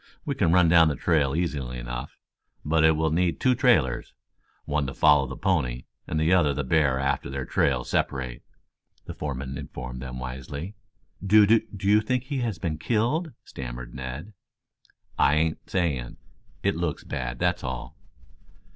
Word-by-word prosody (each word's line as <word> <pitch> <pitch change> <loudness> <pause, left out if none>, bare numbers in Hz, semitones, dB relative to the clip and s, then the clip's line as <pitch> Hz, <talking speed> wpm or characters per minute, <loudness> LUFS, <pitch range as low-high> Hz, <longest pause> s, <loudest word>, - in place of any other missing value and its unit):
We - - -1
can 85 - +1
run 90 0 +5
down 80 -1 +6
the 75 - 0
trail 75 -5 +1
easily 70 -8 -2
enough, - - -6 0.5
but 80 +1 +2
it 80 0 +6
will 80 0 0
need 85 +1 +1
two 130 - +3
trailers, 115 - +2 0.5
one 75 -1 0
to 65 - -6
follow 70 -2 +5
the 65 - -7
pony 65 -11 0 0.2
and 80 - -1
the 80 +3 +3
other 75 -6 +3
the 70 - -1
bear 70 -1 +2
after 70 -1 -1
their 70 0 -4
trails 65 -3 0
separate," 65 -3 -1 0.6
the - - -6
foreman 65 -2 -5
informed 60 0 -7
them 65 -1 -6
wisely. 65 +8 -6 0.5
"Do 105 +2 +6
do 110 -2 +1
you 105 +1 +5
think 125 +3 -1
he 135 +1 -3
has 115 -7 -2
been 80 -2 -3
killed?" 125 - 0
stammered - - -7
Ned. 65 +10 -7 0.9
"I 70 - +5
ain't 80 +1 -1
saying. 75 -10 -1 0.5
It - - +1
looks 85 -3 -2
bad, 60 -4 -4
that's - - 0
all." 65 -1 -5
75 Hz, 165 wpm, -26 LUFS, 65-90 Hz, 0.9 s, down